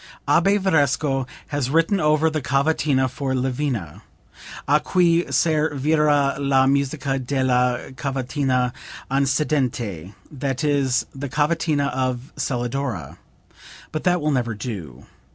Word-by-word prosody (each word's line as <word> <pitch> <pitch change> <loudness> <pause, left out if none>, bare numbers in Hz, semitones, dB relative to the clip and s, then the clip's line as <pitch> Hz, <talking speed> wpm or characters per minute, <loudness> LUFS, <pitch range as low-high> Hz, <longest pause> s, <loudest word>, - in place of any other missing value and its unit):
"Abbe 200 +1 +4
Varesco 145 -7 +1 0.2
has 145 -4 -1
written 165 +6 +2
over 155 0 +3
the 155 -1 -2
cavatina 140 0 +1
for 130 +1 -3
Lavina: 125 - -2 0.7
a 150 +2 +4
cui 175 0 +2
servira 150 -2 +2
la 135 -1 +3
musica 140 0 0
della 125 -1 0
cavatina 130 -1 -1 0.4
antecedente, 130 - -1 0.2
that 135 -1 -3
is 140 -4 +1
the 135 0 -5
cavatina 150 0 +1
of 130 0 -2
Celidora. 120 - -3 0.7
But 155 - -4
that 180 -1 +3
will 150 0 +1
never 120 -5 -1
do. 95 - -7
140 Hz, 110 wpm, -22 LUFS, 125-150 Hz, 0.7 s, Abbe